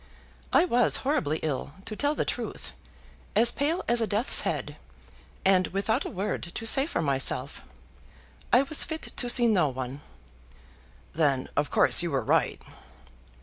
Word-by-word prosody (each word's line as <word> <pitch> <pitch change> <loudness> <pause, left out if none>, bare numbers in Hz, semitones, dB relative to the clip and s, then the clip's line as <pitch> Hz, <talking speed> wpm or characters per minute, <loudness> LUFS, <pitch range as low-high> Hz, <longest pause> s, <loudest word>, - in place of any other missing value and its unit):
"I 345 - +4
was 245 -8 +3
horribly 265 - 0
ill, 145 -1 -3
to 215 - -6
tell 290 +6 0
the - - -1
truth; - - -5 0.6
as 235 +2 +5
pale 310 +5 -1
as 235 0 +2
a 225 - 0
death's 215 +5 +3
head, - - -4 0.7
and 185 -1 +4
without 200 +3 -1
a - - -4
word 200 +3 -3
to 225 - -5
say 270 +5 +3
for 170 - -2
myself. 135 -2 -1 0.9
I 250 +3 +5
was 295 +2 +1
fit 315 0 -6
to 245 - -1
see 240 -1 +5
no 180 -9 +2
one." 130 +2 -6 1.1
"Then 140 -5 0
of 145 0 0
course - - +4
you 175 - -2
were 135 -3 -1
right." - - +1
210 Hz, 155 wpm, -27 LUFS, 150-250 Hz, 1.1 s, as